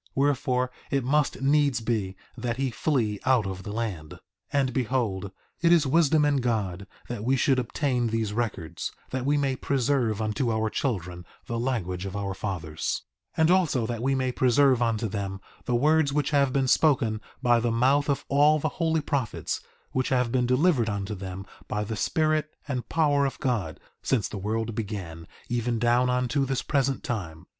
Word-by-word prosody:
Wherefore, 130 -2 +1 0.2
it 140 -2 0
must 145 +1 +1
needs 140 -2 +3
be 110 -5 -2 0.2
that 120 -1 -3
he 135 -1 -1
flee 115 -7 0
out 130 -5 +3
of 95 -1 -4
the 100 - -6
land. 105 -9 -3
3:19 - - -16 0.3
And 135 -3 +1
behold, 115 -7 -1 0.3
it 170 0 +4
is 170 -3 +5
wisdom 155 +1 +4
in 145 -1 +2
God 100 -7 -1 0.2
that 120 -3 -5
we 130 +3 +2
should 135 0 +2
obtain 125 0 0
these 110 -2 -1
records, 105 -8 -3 0.2
that 130 0 -2
we 145 +1 +3
may 135 -2 +1
preserve 125 -5 0
unto 110 +3 0
our 110 0 0
children 90 -9 -2 0.2
the 115 0 -3
language 100 -7 -2
of 95 - -7
our 100 -1 -2
fathers; 85 -6 -3 0.3
3:20 - - +2
And 160 +2 +5
also 165 -10 +2
that 115 0 -3
we 135 +2 +1
may 130 -1 0
preserve 130 0 +3
unto 115 -1 +1
them 100 -2 -4 0.3
the 125 - 0
words 150 +3 +3
which 145 0 0
have 140 -2 +3
been 135 0 +1
spoken 120 -7 +3 0.2
by 120 -1 +4
the 120 +1 0
mouth 135 +5 +3
of 140 - 0
all 145 +2 +4
the 155 +1 -1
holy 160 -1 +2
prophets, 140 -6 -2 0.3
which 130 -1 0
have 125 -2 +1
been 125 -1 +1
delivered 130 -2 +3
unto 100 0 -3
them 95 -1 -6 0.2
by 105 0 -2
the 110 +2 -4
Spirit 155 +5 +1 0.2
and 130 -4 -3
power 145 -3 +3
of 135 - -6
God, 115 - -1 0.2
since 120 -7 +1
the 100 - -6
world 110 +3 -2
began, 95 -7 -5 0.2
even 120 -1 -1
down 120 +2 +3
unto 125 +2 +1
this 135 -1 -1
present 140 -2 0
time. 90 -8 -4
125 Hz, 185 wpm, -26 LUFS, 105-140 Hz, 0.3 s, is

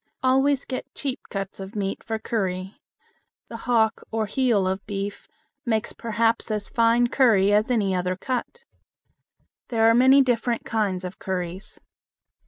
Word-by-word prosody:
Always 270 +1 +3
get 255 - -6
cheap 275 -2 -3
cuts 195 -1 -5
of 195 +3 -8
meat 195 -2 -3
for 225 -1 -3
curry. 190 -4 -3 0.7
The 230 - -6
hock 225 -2 +2
or 220 -1 -1
heel 215 -3 +1
of 190 +1 -2
beef 200 0 -5 0.4
makes 220 -2 -1
perhaps 230 0 0
as 210 -1 -1
fine 230 +1 +3
curry 220 -6 +3
as 210 +3 +3
any 210 -6 +1
other 180 0 -1
cut. 255 - -4 1.0
There 225 -3 +2
are 225 - +6
many 260 +3 +6
different 240 -2 0
kinds 200 -5 -1
of 180 +1 -7
curries. 185 +1 -5
220 Hz, 145 wpm, -24 LUFS, 195-240 Hz, 1.0 s, are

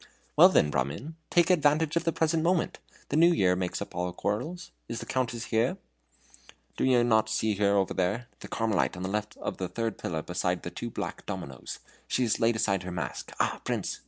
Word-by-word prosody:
"Well, - - +9
then, 75 - +3
Brahmin, 70 - -2
take 175 +1 +4
advantage 155 -1 +3
of 170 - +1
the 165 - +3
present 160 0 +1
moment. 170 +1 +1 0.3
The - - -1
New 170 +2 +7
Year 95 - +3
makes 90 -1 -2
up - - -14
all 90 0 -2
quarrels. 160 - -3 0.2
Is 115 - -3
the - - -6
Countess 120 -2 -2
here?" 120 +11 +2 1.0
"Do - - 0
you 125 -2 +4
not 110 -2 +3
see 110 0 +1
her 100 0 +3
over 95 -1 +1
there 100 +7 0
the - - -9
Carmelite 110 -5 0
on 90 - -5
the 95 - -2
left 105 +1 -3
of - - -4
the 95 - -2
third 115 +3 -3
pillar 80 -2 -3
beside 90 0 -1
the 85 - -5
two 120 +7 -5
black - - -5
dominos. 70 -9 -6 0.3
She 130 - +1
has 115 - +1
laid 115 0 +3
aside 100 -4 +1
her 90 - -6
mask. 90 -2 -4
Ah, - - 0
Prince! - - -2
110 Hz, 210 wpm, -28 LUFS, 90-145 Hz, 1.0 s, Well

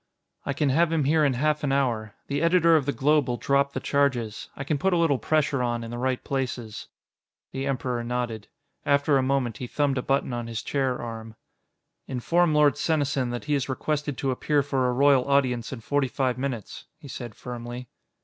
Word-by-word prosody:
"I 140 - 0
can 145 0 +1
have 165 +5 +3
him 160 -3 +1
here 155 +3 +3
in 140 -2 +3
half 150 +4 0
an 140 - 0
hour. 120 -6 0
The 140 +1 -2
editor 170 -1 +5
of 145 -3 +1
the - - +2
Globe 150 0 +2
will 120 -1 -1
drop 140 +1 +1
the - - -2
charges. 130 -7 0
I 135 - -5
can 145 +1 -1
put 190 +3 +2
a - - +3
little 160 -6 +2
pressure 155 -3 +1
on 120 -1 -1
in 115 - -7
the 120 - -5
right 130 0 -1
places." 125 -5 -4 0.6
The 135 +1 -3
Emperor 125 -3 -2
nodded. 120 -3 -3 0.4
After 140 0 +3
a - - +2
moment, 130 -4 0
he 125 - -5
thumbed 140 0 0
a - - -1
button 135 -1 0
on 120 -1 -3
his 115 -2 -4
chair 135 -3 -1
arm. 115 -1 -7 0.7
"Inform 165 +7 +1
Lord 150 -2 +4
Senesin 140 -5 0
that 120 0 -4
he 150 - 0
is 140 -1 0
requested 145 +1 -2
to 135 - 0
appear 145 +3 +1
for 135 -2 0
a - - +1
Royal 135 0 +4
Audience 130 -4 +1
in 130 -4 -6
forty 145 +3 0
five 130 -1 -1
minutes," 130 -5 -5
he - - -12
said 120 -4 -7
firmly. 120 0 -7
135 Hz, 205 wpm, -26 LUFS, 125-145 Hz, 0.7 s, editor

